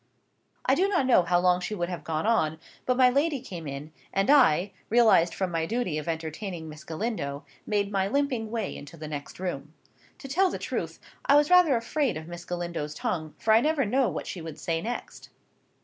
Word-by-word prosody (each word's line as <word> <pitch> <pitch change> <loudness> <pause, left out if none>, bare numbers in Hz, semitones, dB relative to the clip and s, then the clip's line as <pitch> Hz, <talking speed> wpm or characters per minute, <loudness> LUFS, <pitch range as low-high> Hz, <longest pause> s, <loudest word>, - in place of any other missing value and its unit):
I - - +4
do 380 - +3
not 365 -9 +1
know 250 -7 +5
how 175 0 +2
long 180 0 +3
she 180 +4 -4
would 175 -2 -2
have 180 - -5
gone 160 +3 -2
on; 160 -9 +2 0.3
but 250 -1 +2
my 255 -1 +6
lady 285 +2 +1
came 175 - -8
in, 140 +3 -7 0.2
and 195 +7 +2
I, 200 - +5 0.2
released 220 -7 +5
from 190 -2 -1
my 165 -1 -1
duty 220 -9 -1
of 150 - -8
entertaining 165 +1 -4
Miss 150 -1 -10
Galindo, 160 -6 -4 0.2
made 205 -1 0
my 195 -1 +1
limping 255 -2 0
way 225 -2 -3
into 145 +4 -10
the 155 0 -7
next 145 +1 -7
room. 160 -4 -5 0.4
To 275 - -9
tell 370 +8 +3
the - - -4
truth, - - -4 0.3
I 280 - +5
was 295 +3 +4
rather 360 -6 +6
afraid 255 - -1
of 160 0 -8
Miss 175 0 -8
Galindo's 170 -4 -4
tongue, 165 -11 -3
for 220 - +2
I 225 - +6
never 300 -1 +1
knew 255 +4 +2
what - - -5
she 180 - -6
would 160 -2 -7
say 165 -1 -1
next. 240 +5 -6
190 Hz, 210 wpm, -27 LUFS, 160-245 Hz, 0.4 s, my